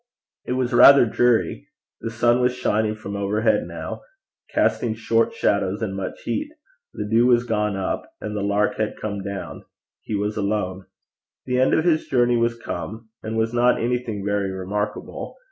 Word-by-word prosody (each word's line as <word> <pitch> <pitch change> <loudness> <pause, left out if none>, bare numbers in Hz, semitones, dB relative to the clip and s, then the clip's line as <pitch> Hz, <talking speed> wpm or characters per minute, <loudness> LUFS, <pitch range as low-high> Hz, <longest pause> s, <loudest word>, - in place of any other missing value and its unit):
It - - -2
was 125 -1 -1
rather 140 +2 +8
dreary; 120 +1 +1 0.3
the 115 - -4
sun 120 +2 +2
was 125 0 +2
shining 110 -3 0
from 100 -2 -7
overhead 105 +3 +1
now, - - -6 0.5
casting 115 -2 +1
short 115 0 +1
shadows 100 +2 0
and 95 -3 -3
much 95 -1 -5
heat; 300 0 -2 0.4
the 105 - -5
dew 115 +3 +4
was 120 -1 +4
gone 105 -3 -1
up, 95 - -3
and 105 0 -5
the 105 - -2
lark 100 +1 +1
had 110 -1 -2
come 100 -2 -4
down; 100 0 -6 0.4
he 110 - -4
was 105 +1 -2
alone; 100 -3 -2 0.6
the 125 0 0
end 130 - +4
of 160 - +1
his 160 -3 +2
journey 120 -2 +3
was 115 0 0
come, 110 +4 -6
and 110 +1 -4
was 110 +1 0
not 120 +1 +3
anything 115 -4 -2
very 100 -1 0
remarkable. 95 +3 -4
110 Hz, 170 wpm, -23 LUFS, 100-120 Hz, 0.6 s, rather